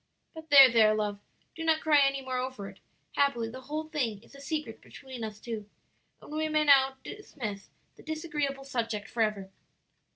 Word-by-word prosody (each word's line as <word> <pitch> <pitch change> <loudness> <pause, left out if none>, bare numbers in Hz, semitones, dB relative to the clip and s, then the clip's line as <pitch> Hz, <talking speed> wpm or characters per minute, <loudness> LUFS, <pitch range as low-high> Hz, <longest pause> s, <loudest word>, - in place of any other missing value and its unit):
"But 320 -1 -11
there, 275 -2 +10
there, 220 -3 +4
love, 210 -1 -2 0.3
do 325 - -6
not 320 -1 +2
cry 300 -2 +4
any 275 -1 +2
more 255 -1 -3
over 255 -6 -5
it; 190 -1 -13 0.3
happily, 240 -5 +1
the 255 +3 -9
whole 305 +4 -4
thing 240 - -3
is - - -20
a 275 - -13
secret 300 -6 -4
between 260 -4 -10
us 215 -1 -6
two, 215 -3 -6 0.5
and - - -14
we 310 +1 -1
may 305 0 +2
now 270 -2 +5
dismiss 225 - -7 0.3
the - - -14
disagreeable 300 -3 -3
subject 230 -6 -3
forever. 215 -5 -1
265 Hz, 175 wpm, -29 LUFS, 220-300 Hz, 0.5 s, there